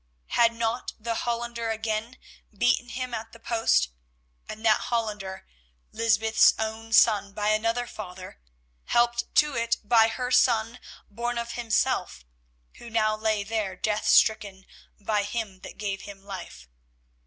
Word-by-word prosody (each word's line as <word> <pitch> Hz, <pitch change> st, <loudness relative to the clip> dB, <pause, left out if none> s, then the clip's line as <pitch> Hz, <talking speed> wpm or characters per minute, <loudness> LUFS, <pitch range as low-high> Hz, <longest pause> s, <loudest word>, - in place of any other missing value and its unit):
Had 230 Hz, -1 st, +4 dB
not 230 Hz, +1 st, -2 dB
the 230 Hz, +1 st, -2 dB
Hollander 235 Hz, 0 st, -3 dB
again 220 Hz, +2 st, -3 dB, 0.4 s
beaten 245 Hz, +1 st, +2 dB
him 255 Hz, 0 st, -5 dB
at 225 Hz, 0 st, -5 dB
the 230 Hz, -, -13 dB
post, 225 Hz, -, +2 dB, 0.6 s
and 220 Hz, +1 st, -7 dB
that 215 Hz, -1 st, +5 dB
Hollander—Lysbeth's 210 Hz, -, 0 dB
own 220 Hz, +1 st, -4 dB
son 210 Hz, -3 st, +4 dB
by 210 Hz, +1 st, -1 dB
another 230 Hz, +3 st, +1 dB
father—helped 180 Hz, -, -4 dB
to 300 Hz, -2 st, +3 dB
it 230 Hz, 0 st, 0 dB
by 225 Hz, +1 st, +5 dB
her 250 Hz, +2 st, -3 dB
son 230 Hz, -1 st, +3 dB, 0.3 s
born 240 Hz, +3 st, -3 dB
of 235 Hz, 0 st, -3 dB
himself, 225 Hz, -, -1 dB, 0.5 s
who 235 Hz, -, -10 dB
now 215 Hz, -1 st, +1 dB
lay 215 Hz, -1 st, 0 dB
there 210 Hz, -3 st, -2 dB
death 215 Hz, +2 st, -1 dB
stricken 210 Hz, -3 st, +3 dB, 0.3 s
by 210 Hz, 0 st, 0 dB
him 205 Hz, -2 st, -4 dB
that -, -, -11 dB
gave 200 Hz, -2 st, -3 dB
him 200 Hz, -1 st, -11 dB
life. 185 Hz, -, -9 dB
220 Hz, 130 wpm, -26 LUFS, 200-235 Hz, 0.6 s, that